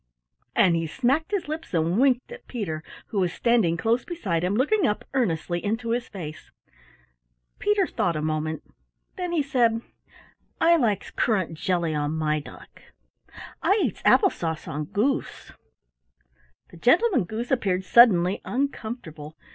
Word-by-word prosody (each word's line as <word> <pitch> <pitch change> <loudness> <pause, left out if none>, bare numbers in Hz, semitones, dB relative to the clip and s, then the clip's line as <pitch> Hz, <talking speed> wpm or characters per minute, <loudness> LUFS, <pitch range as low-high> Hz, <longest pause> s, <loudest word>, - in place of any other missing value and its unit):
And 175 -2 +4
he 165 -1 -1
smacked 270 - 0
his 400 -5 -2
lips 310 - -5
and 165 +5 +1
winked 260 - +2
at 485 - -11
Peter 165 -10 -4 0.3
who 205 - -1
was 180 -2 +1
standing 220 -6 +2
close 230 +7 +1
beside 195 - -2
him, 185 +3 0
looking 300 - +2
up 210 - -2
earnestly 175 - -1
into 225 +2 -2
his 240 +1 -1
face. 155 -6 -8 1.1
Peter 415 -2 +2
thought 175 - -1
a 155 - -2
moment. 155 0 -2 0.5
Then 360 -2 -3
he 325 -4 +1
said: 235 -4 +1 0.8
"I 340 +1 +5
likes 220 - 0
currant 190 -8 0
jelly 175 -3 0
on 150 0 -1
my 155 -1 0
duck. 145 - -13 0.8
I 405 +3 +3
eats - - -2
apple 390 - +5
sauce 160 -2 -4
on 150 +2 -4
goose." 230 - -2 1.2
The 170 - -14
Gentleman 335 - +3
Goose 225 +7 -5
appeared 190 -8 +1
suddenly 190 -5 +5
uncomfortable. 220 - -4
215 Hz, 145 wpm, -25 LUFS, 165-265 Hz, 1.2 s, I